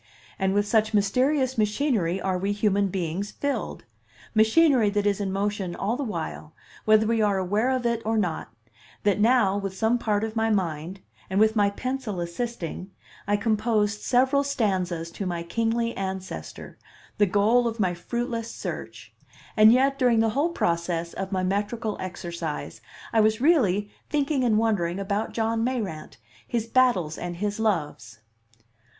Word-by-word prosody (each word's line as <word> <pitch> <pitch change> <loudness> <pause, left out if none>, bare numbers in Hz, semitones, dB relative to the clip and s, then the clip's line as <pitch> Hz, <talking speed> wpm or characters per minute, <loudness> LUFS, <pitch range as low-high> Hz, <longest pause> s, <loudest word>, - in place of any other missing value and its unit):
And 190 0 +1
with 205 0 +2
such 220 0 +2
mysterious 255 +5 +1
machinery 210 - +1
are 190 -1 -1
we 200 +2 0
human 205 -1 +1
beings 185 +1 -3
filled 285 +4 -3 0.5
machinery 230 +1 +4
that 205 0 -1
is 205 0 +1
in 195 -1 -2
motion 195 -2 -2
all 215 +4 -1
the 285 - -3
while, 165 - -5 0.3
whether 215 0 +5
we 225 0 +1
are 205 -2 +2
aware 205 +6 +1
of 255 -2 -1
it 235 -1 0
or 225 +1 0
not 175 - -2 0.5
that 205 -1 +2
now, 215 -3 +3
with 195 -1 -5
some 225 +3 +2
part 210 -2 0
of 220 0 -4
my 225 0 +1
mind, 180 -2 -2 0.3
and 190 +1 +1
with 220 +1 +4
my 205 -2 +3
pencil 250 -2 -4
assisting, 180 0 -4 0.4
I 205 0 +2
composed 215 -1 0
several 265 +3 +3
stanzas 185 -11 -1
to 195 +2 -5
my 170 -1 -3
kingly 230 +5 -1
ancestor, 190 -1 -6 0.4
the 205 - +5
goal 215 +5 +3
of 230 0 -4
my 185 -3 +1
fruitless 230 +5 -3
search; - - -7 0.4
and 215 +1 +7
yet 270 +3 +3
during 245 -3 +4
the 225 0 +3
whole 285 +9 +1
process 170 - -1
of 190 0 -5
my 185 -1 0
metrical 205 +3 -1
exercise 170 -4 -5 0.3
I 225 - +5
was 215 0 +2
really 210 - +2 0.2
thinking 285 -2 0
and 225 -3 +3
wondering 195 -6 +1
about 200 +2 -2
John 225 0 0
Mayrant, 215 - -3 0.3
his 230 -2 -1
battles 230 -10 +2
and 175 0 -4
his 205 +4 -3
loves. 150 - -2
210 Hz, 160 wpm, -25 LUFS, 190-230 Hz, 0.5 s, and